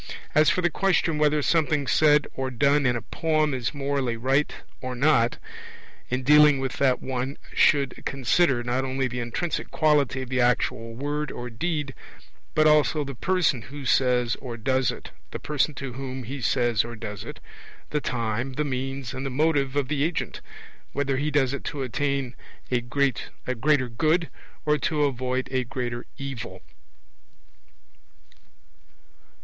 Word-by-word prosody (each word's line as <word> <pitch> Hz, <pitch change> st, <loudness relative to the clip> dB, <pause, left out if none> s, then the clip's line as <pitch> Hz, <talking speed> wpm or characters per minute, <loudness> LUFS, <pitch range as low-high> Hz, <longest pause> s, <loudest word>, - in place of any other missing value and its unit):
As 155 Hz, +1 st, +5 dB
for 185 Hz, -, +1 dB
the 175 Hz, -, +2 dB
question 170 Hz, -4 st, +1 dB
whether 150 Hz, -1 st, +3 dB
something 155 Hz, -3 st, +2 dB
said 150 Hz, +1 st, +4 dB
or 130 Hz, 0 st, -3 dB
done 140 Hz, +2 st, +3 dB
in 120 Hz, -, +2 dB
a 115 Hz, -, -4 dB
poem 155 Hz, +3 st, 0 dB
is 125 Hz, -2 st, -2 dB
morally 140 Hz, -4 st, -1 dB
right 135 Hz, +5 st, +1 dB, 0.3 s
or 130 Hz, -1 st, -4 dB
not, 125 Hz, -3 st, +3 dB, 0.7 s
in 130 Hz, +1 st, -1 dB
dealing 150 Hz, +1 st, +7 dB
with 135 Hz, -1 st, -3 dB
that 130 Hz, -2 st, +2 dB
one 130 Hz, +1 st, -3 dB, 0.2 s
should 140 Hz, -3 st, +3 dB
consider 135 Hz, 0 st, +2 dB
not 120 Hz, +2 st, 0 dB
only 135 Hz, 0 st, -1 dB
the 125 Hz, 0 st, -4 dB
intrinsic 120 Hz, +8 st, -3 dB
quality 145 Hz, -4 st, +2 dB
of 125 Hz, -, -9 dB
the 130 Hz, -1 st, +1 dB
actual 115 Hz, -1 st, 0 dB
word 145 Hz, +3 st, -2 dB
or 120 Hz, 0 st, -6 dB
deed, 150 Hz, +2 st, -2 dB, 0.6 s
but 155 Hz, -, +4 dB
also 150 Hz, 0 st, +4 dB
the 140 Hz, -1 st, -6 dB
person 160 Hz, -2 st, +1 dB
who 140 Hz, +5 st, -9 dB
says 125 Hz, -2 st, +2 dB
or 120 Hz, -3 st, -7 dB
does 130 Hz, +2 st, +1 dB
it, -, -, -10 dB, 0.2 s
the -, -, -5 dB
person 150 Hz, 0 st, -1 dB
to 135 Hz, -1 st, -5 dB
whom 130 Hz, 0 st, -5 dB
he 135 Hz, +4 st, -6 dB
says 120 Hz, -1 st, +2 dB
or 120 Hz, 0 st, -7 dB
does 105 Hz, -3 st, -6 dB
it, -, -, -8 dB, 0.5 s
the 150 Hz, -, 0 dB
time, 120 Hz, +1 st, -2 dB
the 150 Hz, +3 st, -1 dB
means, 135 Hz, -1 st, -3 dB
and 130 Hz, +1 st, -4 dB
the 135 Hz, -, -2 dB
motive 140 Hz, -1 st, +1 dB
of 145 Hz, -3 st, +1 dB
the 145 Hz, 0 st, 0 dB
agent 165 Hz, +1 st, -2 dB, 0.5 s
whether 140 Hz, -1 st, 0 dB
he 145 Hz, +2 st, 0 dB
does 140 Hz, -3 st, +2 dB
it 140 Hz, -, -4 dB
to 140 Hz, -2 st, -3 dB
attain 135 Hz, 0 st, -1 dB, 0.4 s
a 125 Hz, -1 st, +2 dB
greater 130 Hz, +1 st, 0 dB
good, 155 Hz, +8 st, +1 dB, 0.4 s
or 150 Hz, 0 st, +2 dB
to 150 Hz, -2 st, +1 dB
avoid 130 Hz, -1 st, -1 dB
a 130 Hz, -1 st, +1 dB
greater 120 Hz, 0 st, -4 dB
evil. 120 Hz, -9 st, -6 dB
135 Hz, 160 wpm, -25 LUFS, 125-150 Hz, 0.7 s, dealing